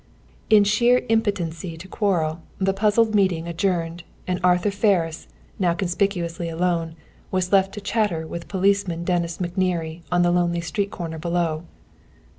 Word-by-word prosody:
In 215 Hz, -2 st, +7 dB
sheer 235 Hz, +5 st, +3 dB
impotency 180 Hz, -7 st, -1 dB
to 180 Hz, +4 st, -10 dB
quarrel, 170 Hz, -6 st, 0 dB, 0.2 s
the 195 Hz, 0 st, +1 dB
puzzled 215 Hz, +2 st, +2 dB
meeting 185 Hz, -5 st, +2 dB
adjourned, 170 Hz, -1 st, -1 dB, 0.2 s
and 180 Hz, -1 st, -1 dB
Arthur 180 Hz, +2 st, +3 dB
Ferris, 190 Hz, -6 st, +1 dB, 0.3 s
now 175 Hz, -3 st, +2 dB
conspicuously 175 Hz, -3 st, -1 dB
alone, 165 Hz, -1 st, -1 dB, 0.3 s
was 185 Hz, -1 st, -1 dB
left 195 Hz, -1 st, +4 dB
to 210 Hz, -, -6 dB
chatter 200 Hz, -6 st, 0 dB
with 170 Hz, +1 st, -7 dB
Policeman 195 Hz, -3 st, +1 dB
Dennis 170 Hz, -1 st, -1 dB
McNerney 175 Hz, -2 st, -2 dB
on 175 Hz, 0 st, +3 dB
the 175 Hz, -, +3 dB
lonely 175 Hz, -1 st, +1 dB
street 200 Hz, +4 st, -2 dB
corner 165 Hz, -5 st, -6 dB
below. 170 Hz, -1 st, -1 dB
180 Hz, 140 wpm, -23 LUFS, 170-200 Hz, 0.3 s, In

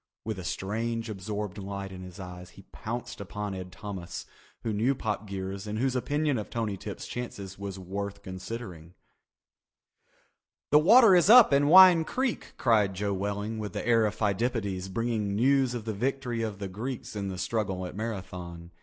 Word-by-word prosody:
With 110 Hz, -3 st, -3 dB
a -, -, -6 dB
strange 115 Hz, +5 st, -2 dB
absorbed 105 Hz, 0 st, -4 dB
light 100 Hz, 0 st, -5 dB
in 95 Hz, -1 st, -8 dB
his 90 Hz, +1 st, -10 dB
eyes 90 Hz, -1 st, -8 dB
he -, -, -15 dB
pounced 120 Hz, -1 st, -5 dB
upon 105 Hz, +1 st, -5 dB
Ed 90 Hz, -1 st, -7 dB
Thomas, 90 Hz, -1 st, -7 dB, 0.4 s
he -, -, -4 dB
who 110 Hz, -, 0 dB
knew 120 Hz, +7 st, +2 dB
Pop 105 Hz, -3 st, -3 dB
Geers 95 Hz, +1 st, -5 dB
and 105 Hz, +1 st, -3 dB
whose 130 Hz, +2 st, 0 dB
opinion 145 Hz, 0 st, 0 dB
of 105 Hz, -, -6 dB
Tony 110 Hz, -4 st, -2 dB
Tip's -, -, -7 dB
chances 100 Hz, -6 st, -6 dB
was 100 Hz, -1 st, -5 dB
worth 100 Hz, +2 st, -5 dB
considering. 95 Hz, -3 st, -7 dB, 1.8 s
"The 150 Hz, -, +8 dB
water 215 Hz, +4 st, +7 dB
is 175 Hz, +2 st, +4 dB
up 235 Hz, -, +9 dB
in 140 Hz, +1 st, +4 dB
Wine 180 Hz, 0 st, +9 dB
Creek," 255 Hz, +7 st, -2 dB
cried 105 Hz, -5 st, +3 dB
Joe 100 Hz, +1 st, -1 dB
Welling 105 Hz, +3 st, -3 dB
with 105 Hz, -4 st, -5 dB
the -, -, -4 dB
air 115 Hz, -2 st, +4 dB
of 105 Hz, -, -4 dB
Pheidippides 100 Hz, -3 st, -1 dB
bringing 110 Hz, -1 st, -1 dB
news 130 Hz, +2 st, +3 dB
of 115 Hz, -3 st, -5 dB
the 110 Hz, -, -2 dB
victory 125 Hz, +1 st, -2 dB
of 110 Hz, -3 st, -3 dB
the 100 Hz, -1 st, -4 dB
Greeks 110 Hz, +5 st, -6 dB
in 100 Hz, -1 st, -3 dB
the 95 Hz, -1 st, -4 dB
struggle 95 Hz, -2 st, -2 dB
at 90 Hz, -, -7 dB
Marathon. 90 Hz, -6 st, -6 dB
105 Hz, 180 wpm, -28 LUFS, 95-120 Hz, 1.8 s, up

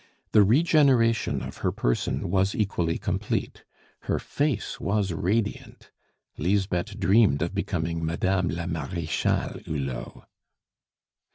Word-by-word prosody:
The 105 Hz, -, +6 dB
regeneration 125 Hz, -, +3 dB
of -, -, -7 dB
her -, -, 0 dB
person -, -, -1 dB
was 95 Hz, 0 st, +2 dB
equally 90 Hz, -6 st, 0 dB
complete; -, -, -3 dB, 0.5 s
her -, -, +2 dB
face 145 Hz, -7 st, -2 dB
was 100 Hz, -2 st, 0 dB
radiant. 100 Hz, +6 st, -2 dB, 0.5 s
Lisbeth 95 Hz, +3 st, 0 dB
dreamed 95 Hz, -7 st, +4 dB
of 85 Hz, -, -3 dB
becoming 85 Hz, -4 st, -2 dB
Madame 90 Hz, +3 st, 0 dB
la 85 Hz, +3 st, -3 dB
Marechale 85 Hz, -1 st, -2 dB
Hulot. 70 Hz, -5 st, -5 dB
95 Hz, 105 wpm, -26 LUFS, 85-105 Hz, 0.5 s, The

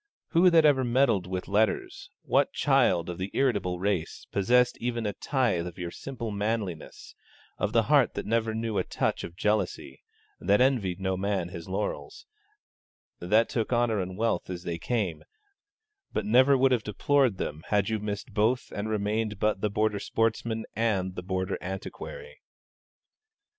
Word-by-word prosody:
Who 180 Hz, +2 st, +5 dB
that 165 Hz, -2 st, +5 dB
ever 140 Hz, -3 st, +4 dB
meddled 120 Hz, -7 st, +2 dB
with 90 Hz, 0 st, -4 dB
letters, 105 Hz, +2 st, 0 dB
what -, -, +2 dB
child 85 Hz, -2 st, +2 dB
of 90 Hz, 0 st, -6 dB
the 95 Hz, +2 st, -3 dB
irritable 100 Hz, -9 st, +1 dB
race, 95 Hz, -3 st, -2 dB
possessed 125 Hz, +5 st, +3 dB
even 120 Hz, -1 st, -2 dB
a 105 Hz, -, -1 dB
tithe 120 Hz, -12 st, 0 dB
of 90 Hz, -, -9 dB
your 85 Hz, -1 st, -5 dB
simple 120 Hz, -2 st, -6 dB
manliness, 100 Hz, -5 st, -4 dB, 0.5 s
of -, -, 0 dB
the -, -, +3 dB
heart -, -, +3 dB
that -, -, -4 dB
never 110 Hz, 0 st, 0 dB
knew 110 Hz, -2 st, -1 dB
a -, -, +1 dB
touch -, -, -2 dB
of 85 Hz, -, -8 dB
jealousy, 105 Hz, +2 st, -1 dB, 0.4 s
that 100 Hz, -, +3 dB
envied 120 Hz, -9 st, +2 dB
no 95 Hz, 0 st, -1 dB
man 95 Hz, -2 st, -1 dB
his 85 Hz, 0 st, -8 dB
laurels, 100 Hz, +2 st, -4 dB, 0.9 s
that 105 Hz, +6 st, +3 dB
took 115 Hz, 0 st, -2 dB
honour 120 Hz, -3 st, +2 dB
and 90 Hz, 0 st, -6 dB
wealth 115 Hz, -2 st, 0 dB
as 90 Hz, -1 st, -5 dB
they 85 Hz, -1 st, -4 dB
came, 100 Hz, -3 st, -2 dB, 0.9 s
but -, -, -2 dB
never 130 Hz, +5 st, +5 dB
would 130 Hz, 0 st, +3 dB
have 125 Hz, -3 st, +2 dB
deplored 125 Hz, +2 st, +1 dB
them 75 Hz, -2 st, -4 dB
had 105 Hz, -1 st, +1 dB
you 110 Hz, -1 st, -1 dB
missed 105 Hz, +2 st, -5 dB
both 115 Hz, +5 st, +1 dB
and 105 Hz, +2 st, -3 dB
remained 105 Hz, 0 st, -1 dB
but 105 Hz, -1 st, 0 dB
the 105 Hz, -, +1 dB
Border 105 Hz, 0 st, 0 dB
sportsman 115 Hz, +1 st, -1 dB
and 100 Hz, -5 st, 0 dB
the -, -, -5 dB
Border 95 Hz, +1 st, -2 dB
antiquary? 460 Hz, -, -7 dB
105 Hz, 165 wpm, -28 LUFS, 95-120 Hz, 0.9 s, Who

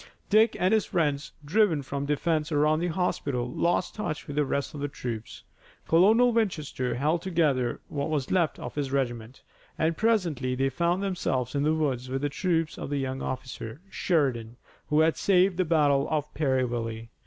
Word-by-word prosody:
Dick 220 Hz, +2 st, +4 dB
and 185 Hz, +4 st, +3 dB
his 220 Hz, -2 st, +2 dB
friends, 145 Hz, -4 st, 0 dB
driven 170 Hz, -3 st, +2 dB
from 140 Hz, +1 st, -4 dB
the 150 Hz, -, +2 dB
defense 155 Hz, 0 st, -1 dB
around 150 Hz, +1 st, +3 dB
the 175 Hz, -, 0 dB
hospital, 145 Hz, -8 st, -1 dB
lost 175 Hz, +4 st, 0 dB
touch 175 Hz, -8 st, -4 dB
with 145 Hz, -, -7 dB
the 150 Hz, -, +3 dB
rest 140 Hz, +1 st, -2 dB
of 145 Hz, -, -7 dB
the 145 Hz, -, -1 dB
troops. 120 Hz, -5 st, -6 dB, 0.4 s
Colonel 220 Hz, +9 st, +5 dB
Winchester 155 Hz, -, -1 dB
held 155 Hz, +6 st, +1 dB
together 150 Hz, -10 st, 0 dB
what 140 Hz, 0 st, -3 dB
was 145 Hz, -4 st, -2 dB
left 175 Hz, -4 st, +2 dB
of -, -, -7 dB
his 140 Hz, -2 st, -3 dB
regiment, 120 Hz, -3 st, -3 dB, 0.3 s
and 160 Hz, +1 st, +1 dB
presently 170 Hz, -, +1 dB
they 135 Hz, +1 st, +1 dB
found 175 Hz, +6 st, 0 dB
themselves 135 Hz, -10 st, -1 dB
in 140 Hz, -, 0 dB
the 155 Hz, +2 st, +2 dB
woods 130 Hz, -5 st, -1 dB
with 135 Hz, +2 st, -3 dB
the 145 Hz, -, +1 dB
troops 165 Hz, 0 st, -1 dB
of -, -, -5 dB
the 145 Hz, -, -1 dB
young 135 Hz, -1 st, -3 dB
officer, 130 Hz, -2 st, -5 dB
Sheridan, 125 Hz, -9 st, 0 dB, 0.3 s
who 150 Hz, +1 st, +3 dB
had 160 Hz, 0 st, +3 dB
saved 185 Hz, -1 st, +3 dB
the 185 Hz, -, +2 dB
battle 145 Hz, -4 st, +3 dB
of 150 Hz, -2 st, -2 dB
Perryville. 120 Hz, -5 st, -1 dB
150 Hz, 180 wpm, -27 LUFS, 130-170 Hz, 0.4 s, Colonel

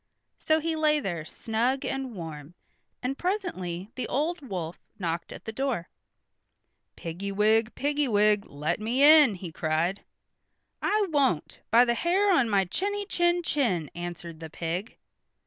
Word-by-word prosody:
So 315 Hz, 0 st, +2 dB
he 325 Hz, +1 st, -1 dB
lay 305 Hz, -1 st, +3 dB
there 175 Hz, -, -3 dB
snug 235 Hz, +9 st, -1 dB
and 270 Hz, -3 st, -3 dB
warm, 160 Hz, -2 st, -8 dB, 0.5 s
and 265 Hz, +2 st, -2 dB
presently 220 Hz, -, -3 dB
the 255 Hz, -, -4 dB
old 320 Hz, +5 st, -1 dB
wolf 180 Hz, -, -5 dB, 0.2 s
knocked 170 Hz, -4 st, -3 dB
at -, -, -10 dB
the 220 Hz, -, -4 dB
door. 245 Hz, -7 st, -2 dB, 1.1 s
"Piggy 175 Hz, +4 st, -5 dB
wig, 215 Hz, +3 st, +2 dB
piggy 290 Hz, 0 st, 0 dB
wig, 210 Hz, -2 st, +3 dB
let 150 Hz, +8 st, -2 dB
me 235 Hz, +6 st, +1 dB
in!" 295 Hz, -7 st, +8 dB
he 180 Hz, -2 st, -7 dB
cried. 160 Hz, +4 st, 0 dB, 0.8 s
"I 420 Hz, 0 st, +2 dB
won't, 270 Hz, -, +1 dB
by 235 Hz, +2 st, +6 dB
the 235 Hz, -, +2 dB
hair 375 Hz, +9 st, +2 dB
on 255 Hz, -9 st, +3 dB
my 195 Hz, -2 st, +3 dB
chinny 405 Hz, -, -2 dB
chin 345 Hz, -2 st, +1 dB
chin," 205 Hz, -, 0 dB
answered 170 Hz, -1 st, -7 dB
the 160 Hz, -1 st, -7 dB
pig. 170 Hz, +6 st, -4 dB
225 Hz, 145 wpm, -27 LUFS, -, 1.1 s, in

